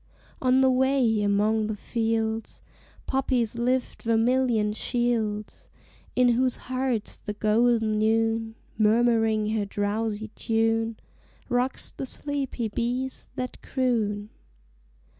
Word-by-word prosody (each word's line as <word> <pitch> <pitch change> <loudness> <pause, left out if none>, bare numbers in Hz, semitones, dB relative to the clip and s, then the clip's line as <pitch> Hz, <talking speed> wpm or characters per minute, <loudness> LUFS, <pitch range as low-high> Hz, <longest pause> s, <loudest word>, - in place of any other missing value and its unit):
On 255 0 +4
the 260 -1 +5
way, 255 -4 +2
among 210 +2 +2
the 215 - -2
fields, 225 0 -2 0.4
Poppies 255 -4 0
lift 250 +2 -1
vermilion 230 -1 +2
shields, 220 -3 -2 0.5
In 250 -1 +4
whose 250 +1 +2
hearts 255 -4 -2
the 210 - -6
golden 220 +1 +2
Noon, 225 0 +1 0.2
Murmuring 220 -1 +3
her 215 -2 0
drowsy 210 +2 -2
tune, 225 0 0 0.5
Rocks 250 +1 -1
the 270 - -6
sleepy 275 -5 -3
bees 245 +4 -3
that 255 0 -5
croon. 215 -5 -1
225 Hz, 105 wpm, -26 LUFS, 215-250 Hz, 0.5 s, the